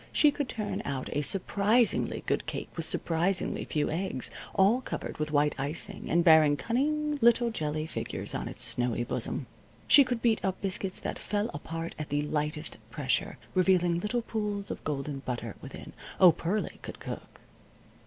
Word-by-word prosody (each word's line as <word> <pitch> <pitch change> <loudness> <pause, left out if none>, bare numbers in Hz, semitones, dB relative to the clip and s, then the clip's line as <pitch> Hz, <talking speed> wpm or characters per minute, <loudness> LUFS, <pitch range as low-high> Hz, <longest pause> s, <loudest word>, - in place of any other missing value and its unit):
She 300 - +5
could 285 -3 -3
turn 210 -2 -3
out 135 -2 -4
a 145 - +2
surprisingly 200 - +2
good - - -1
cake - - -4
with - - +1
surprisingly 175 +3 +1
few 150 -2 -1
eggs, 165 -6 -2 0.2
all 205 +6 +4
covered - - -5
with 155 0 -1
white 150 0 +2
icing, 145 +4 -3
and 170 +1 +3
bearing 160 -3 +6
cunning 295 - 0
little 235 0 +4
jelly 155 -5 -2
figures - - -4
on - - -3
its - - -1
snowy 120 -1 +1
bosom. 120 - -3 0.4
She 285 - +8
could 245 -3 -3
beat 225 -3 +2
up 190 -1 -1
biscuits 195 -1 -2
that - - -4
fell 210 +1 -1
apart 165 +3 -5
at 150 - -5
the 145 +1 0
lightest 150 +1 -2
pressure, 130 +2 -1 0.2
revealing 180 -2 +3
little 220 +5 -1
pools 210 -3 -3
of - - -6
golden 140 -1 -3
butter 120 -5 -5
within. - - -9 0.3
Oh, 180 -2 +9
Pearlie 185 +6 -2
could - - -8
cook! - - -8
175 Hz, 165 wpm, -29 LUFS, 150-215 Hz, 0.4 s, Oh